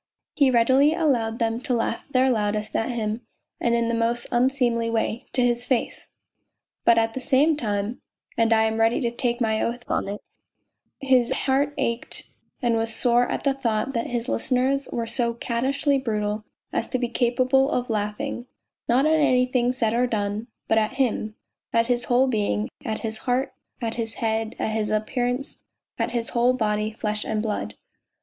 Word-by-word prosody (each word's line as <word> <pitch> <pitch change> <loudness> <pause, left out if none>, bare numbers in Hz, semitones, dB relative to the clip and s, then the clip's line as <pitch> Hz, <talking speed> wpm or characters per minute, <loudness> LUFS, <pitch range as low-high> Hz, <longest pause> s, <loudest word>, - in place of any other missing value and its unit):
He 280 -2 +4
readily 260 +5 +4
allowed 245 -9 +1
them 230 0 -1
to 250 - 0
laugh 230 0 -2
their 260 -1 +3
loudest 215 -1 -1
at 225 - 0
him 225 -1 -2 0.4
and 235 0 +2
in 235 0 +1
the 235 - 0
most 230 +1 0
unseemly 240 -2 +2
way, 225 0 -1
to 250 - +2
liis 240 0 +1
face, 250 -3 -2 0.7
but 235 - +5
at 225 0 +2
the 260 - -4
same 290 +4 +3
time 210 -3 -2 0.3
and 230 0 +2
I 220 -1 +5
am 220 0 0
ready 225 +1 +3
to 235 -2 -1
take 240 0 -1
my 220 -2 +1
oath 240 +1 -2
on - - -1
it 205 +1 -4 0.8
his 255 -3 +3
heart 285 +2 +1
ached 235 +1 -1 0.4
and 235 -1 +2
was 225 0 -1
sore 240 +1 +3
at - - -3
the 275 - +2
thought 255 -1 -1
that 230 -2 -1
his 240 0 -3
listeners 260 +2 0
AM - - -4
rv 230 - -3
so 235 0 +1
caddishly 270 +4 0
brutal 210 -2 -2 0.3
as - - -1
to 255 - -1
be 245 -1 -1
capable 255 +3 +2
of 250 -4 -1
laughing, 220 +5 -3 0.4
not 255 +4 +4
at 315 0 +4
anything 250 -3 +3
said 230 -3 0
or 245 +2 +2
done, 210 0 -2 0.2
but 220 - +4
at 215 +3 -1
him, 230 -5 -1 0.4
at 230 0 +3
his 245 0 0
whole 250 +2 +4
being, 205 - 0
at 220 -1 -3
his 220 -1 -4
heart, 255 +2 +1 0.3
at 230 -2 -2
his 225 -1 -3
head, 225 0 -1
at - - -1
his 215 -1 -1
appearance, 245 +5 -1 0.4
at 230 +1 0
his 235 -1 -1
whole 245 +1 +3
body, 215 -3 0
flesh 210 -1 -3
and 215 -1 -2
blood. 215 -2 -3
235 Hz, 185 wpm, -24 LUFS, 225-255 Hz, 0.8 s, but